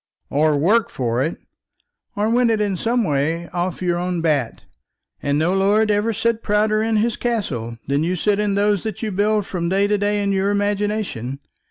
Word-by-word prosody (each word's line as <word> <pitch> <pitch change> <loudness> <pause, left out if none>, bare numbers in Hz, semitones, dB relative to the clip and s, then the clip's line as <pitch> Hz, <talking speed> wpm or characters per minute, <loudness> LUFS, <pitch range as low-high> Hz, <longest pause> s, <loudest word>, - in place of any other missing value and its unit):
"Or 150 +1 +2
work 205 +10 +3
for 120 -1 -1
it." 155 +5 -1 0.8
"Or 210 +1 0
win 240 +1 +3
it 220 -1 +1
in 205 -2 0
some 230 +6 0
way 160 +1 -1
off 180 +1 -3
your 175 -1 0
own 180 0 -2
bat; 150 -8 -1 0.6
and 145 0 0
no 165 +4 +1
lord 205 +3 +3
ever 210 +2 +1
sat 225 +1 0
prouder 215 0 +1
in 225 0 0
his 225 +2 +1
castle 135 - -3
than 140 +2 +1
you 180 +3 0
sit 205 +3 +1
in 205 -1 0
those 205 -1 +2
that 220 -1 -5
you 215 - -1
build 205 +1 +1
from 170 -3 -3
day 195 +2 +2
to 205 0 +1
day 205 0 0
in 200 - 0
your 195 0 +1
imagination. 205 - -1
200 Hz, 195 wpm, -21 LUFS, 165-215 Hz, 0.8 s, work